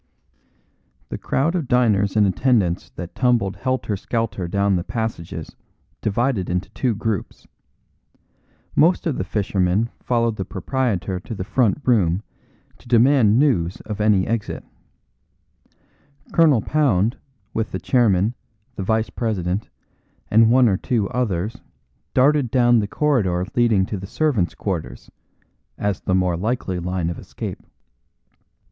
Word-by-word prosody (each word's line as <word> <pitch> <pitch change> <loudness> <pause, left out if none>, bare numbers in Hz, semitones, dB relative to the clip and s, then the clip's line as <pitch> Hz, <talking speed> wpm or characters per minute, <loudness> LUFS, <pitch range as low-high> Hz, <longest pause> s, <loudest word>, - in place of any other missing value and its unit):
The - - -5
crowd 155 +6 0
of 170 -7 -2
diners 110 -5 +2
and 105 - +5
attendants 95 -2 +1
that 85 0 -7
tumbled 120 -6 +1
helter 130 -5 -1
skelter 110 -3 -2
down 100 +2 +1
the 85 - -1
passages 110 -6 -5 0.5
divided 110 -2 0
into 90 +2 -2
two 120 -1 -1
groups. 110 -2 -4 1.3
Most 170 +4 +3
of 160 -6 0
the - - 0
Fishermen 100 +2 0
followed 115 -2 0
the 95 - -2
proprietor 95 -2 -2
to 115 +5 -7
the 95 - -4
front 115 +4 +1
room 100 -6 +2 0.6
to - - -18
demand 120 -2 +4
news 95 - +2
of 105 -1 -5
any 105 -3 +3
exit. 115 -2 -3 1.7
Colonel 150 -9 +4
Pound, 120 -8 +1 0.4
with 110 -1 -2
the 95 - -3
chairman, 110 -3 +2 0.4
the 95 - -2
vice 110 +3 0
president, 100 -4 -2 0.6
and 110 +1 +6
one 125 +1 +5
or 95 -4 +2
two 110 -3 -1
others 110 -2 -2 0.5
darted 135 0 +4
down 120 -1 +4
the 105 - -1
corridor 100 -11 +1
leading 115 -6 +3
to 105 - -4
the 95 +1 -7
servants' 100 - 0
quarters, 80 -12 -5 0.7
as 100 -2 -1
the 95 - 0
more 90 -2 +1
likely 100 -2 -2
line 90 -1 -2
of 85 - -7
escape. - - -7
110 Hz, 130 wpm, -22 LUFS, 95-125 Hz, 1.7 s, and